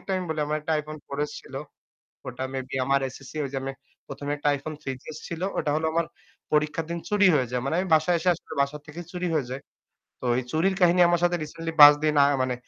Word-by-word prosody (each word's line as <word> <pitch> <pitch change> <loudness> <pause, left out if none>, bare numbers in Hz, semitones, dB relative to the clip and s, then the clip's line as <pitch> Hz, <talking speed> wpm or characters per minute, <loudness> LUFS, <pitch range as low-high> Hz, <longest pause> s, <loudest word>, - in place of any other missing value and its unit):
একটা 195 - -5
আমি 185 - -2
বলি, 155 -1 -2
আমার 150 +1 -1
একটা 155 +2 -2
iphone 155 +1 -9
4s 145 +1 -3
ছিল। - - -14 0.7
ওটা 125 +1 -6
maybe 130 0 -5
আমার 140 +1 +2
SSC 135 - -12
ওই 140 - -3
যে 135 - -3
আমি 135 - -3 0.3
১ম, 145 - -8
এ 145 - +1
একটা 145 0 0
iPhone 150 +2 -7
3gs 135 +3 -6
ছিল। 170 0 -5 0.2
ওটা 150 - 0
হলো 160 - 0
আমার 165 0 +1 0.5
পরীক্ষার 150 +1 +1
দিন 170 - -2
চুরি 205 -1 +4
হয়ে 130 -4 +2
যায়। 125 0 -1
মানে 135 +4 -1
আমি 185 - -1
বাসায় 160 +3 +3
এসে 180 - -1
আসলে 165 - -13
বাসা 140 +2 -3
থেকেই 165 +3 -8
চুরি 180 0 -2
হয়ে 140 -5 0
যায়। 130 +2 -5 0.6
তো - - -9
ওই 130 - 0
চুরির 185 +6 +1
কাহিনী 180 0 +5
আমার 175 0 +2
সাথে 175 0 +2
recently 165 +2 -6
৫ 145 0 +12
দিন 155 - +2
আ - - +5 0.2
মানে 130 -1 0
150 Hz, 235 wpm, -26 LUFS, 140-170 Hz, 0.7 s, ৫